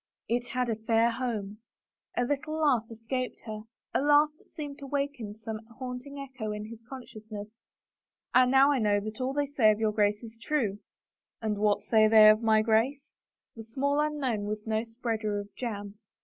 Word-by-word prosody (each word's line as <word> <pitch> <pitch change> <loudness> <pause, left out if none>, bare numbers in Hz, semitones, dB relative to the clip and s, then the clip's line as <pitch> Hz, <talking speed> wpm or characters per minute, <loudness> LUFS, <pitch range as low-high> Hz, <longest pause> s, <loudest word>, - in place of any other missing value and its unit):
" - - -62
It 245 0 -3
had 250 0 -1
a 225 - 0
fair 225 +1 +2
home." 215 -4 -3 0.6
A 245 - +3
little 290 +4 -2
laugh 275 -8 +2
escaped 235 +3 -4
her 215 -1 -6
— - - -59
a - - +2
laugh 295 +1 +5
that - - -26
seemed 290 -3 -7
to 280 - -8
waken 275 -7 -3
some 220 0 -6 0.2
haunting 255 +2 -6
echo 260 -6 -5
in 210 0 -5
his 230 0 -10
consciousness. 215 -5 -8 0.4
" - - -58
Ah, 255 - +7
now 270 +3 +5
I 275 - +2
know 205 -2 +3 0.2
all 260 +1 -1
that 290 - +1
they 285 - -16
say 230 -6 +5
of 215 0 +2
your 220 -1 +2
Grace 210 +1 +1
is 225 0 -11
true! 230 -10 0 0.2
" - - -64
" - - -62
And 210 -2 -1
what 210 -1 +2
5ay 215 -1 +4
they 215 -1 +9
of 215 +1 +1
my 220 -1 +4
Grace? 240 +6 +1 0.2
" - - -62
But 225 - -8
the - - -9
small 280 +3 +1
unknown 275 -8 0
was 210 0 -4
no 220 0 0
spreader 225 -3 -3
of 205 0 -9
jam. 205 -4 -5
230 Hz, 210 wpm, -29 LUFS, 215-270 Hz, 0.6 s, they